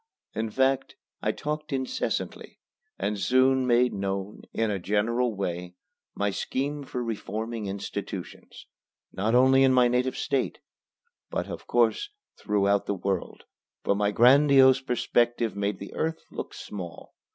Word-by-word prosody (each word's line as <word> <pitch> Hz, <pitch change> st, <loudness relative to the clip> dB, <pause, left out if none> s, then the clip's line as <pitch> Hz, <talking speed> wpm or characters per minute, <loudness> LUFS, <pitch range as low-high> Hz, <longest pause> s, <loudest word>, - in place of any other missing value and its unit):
In 110 Hz, 0 st, -2 dB
fact 130 Hz, +3 st, +1 dB, 0.3 s
I -, -, +1 dB
talked 150 Hz, 0 st, -4 dB
incessantly, 130 Hz, -1 st, -3 dB, 0.4 s
and 100 Hz, +1 st, -2 dB
soon 130 Hz, +5 st, +3 dB
made 125 Hz, 0 st, +4 dB
known, 100 Hz, +1 st, -3 dB
in 110 Hz, -1 st, 0 dB
a 100 Hz, -, -1 dB
general 110 Hz, +5 st, 0 dB
way, 90 Hz, -2 st, -4 dB, 0.4 s
my 100 Hz, 0 st, 0 dB
scheme 145 Hz, +8 st, -2 dB
for 125 Hz, -3 st, -4 dB
reforming 110 Hz, 0 st, -4 dB
institutions, 100 Hz, 0 st, -6 dB, 0.5 s
not 110 Hz, +5 st, 0 dB
only 130 Hz, +1 st, +6 dB
in 135 Hz, -1 st, +5 dB
my 125 Hz, -1 st, +6 dB
native 125 Hz, +1 st, 0 dB
State, 135 Hz, -2 st, -1 dB, 0.7 s
but, -, -, -2 dB
of -, -, -8 dB
course, 410 Hz, 0 st, +2 dB, 0.3 s
throughout 100 Hz, -1 st, +1 dB
the 100 Hz, -, 0 dB
world, 95 Hz, -1 st, -3 dB, 0.4 s
for -, -, +2 dB
my 100 Hz, 0 st, +1 dB
grandiose 135 Hz, +3 st, +6 dB
perspective 120 Hz, -3 st, +1 dB
made 100 Hz, 0 st, -1 dB
the 100 Hz, -, -9 dB
earth 160 Hz, +1 st, -2 dB
look -, -, -6 dB
small. 90 Hz, -5 st, -8 dB
115 Hz, 135 wpm, -27 LUFS, 100-130 Hz, 0.7 s, only